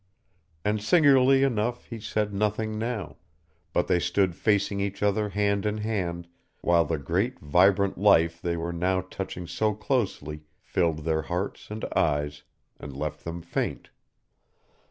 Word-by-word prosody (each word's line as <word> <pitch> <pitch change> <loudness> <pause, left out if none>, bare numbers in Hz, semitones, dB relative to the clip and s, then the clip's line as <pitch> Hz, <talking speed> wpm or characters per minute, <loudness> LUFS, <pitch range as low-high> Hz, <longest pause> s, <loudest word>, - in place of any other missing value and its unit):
And 105 0 +1
singularly 135 0 +5
enough 120 -2 0
he 115 - -7
said 105 -1 -2
nothing 105 +1 -1
now, 110 -11 -4 0.5
but - - +1
they 90 - +2
stood 85 +1 +1
facing 100 -1 +1
each 100 +1 -3
other 105 +1 +1
hand 100 0 +1
in 105 0 -1
hand, 90 -6 -2 0.3
while 85 -1 +3
the 80 +1 -1
great 90 - -1
vibrant 95 +6 +3
life 85 -5 +4
they 85 -1 -1
were 85 +1 -3
now 95 +2 +1
touching 95 -1 -6
so 105 +4 0
closely 100 - -2 0.2
filled 80 -2 -1
their 80 -1 +1
hearts 90 +4 -4
and 105 +1 -4
eyes, 75 -1 0 0.4
and 70 -2 -8
left 75 +1 -4
them 85 +1 -6
faint. 85 - -3
100 Hz, 145 wpm, -27 LUFS, 85-105 Hz, 0.5 s, singularly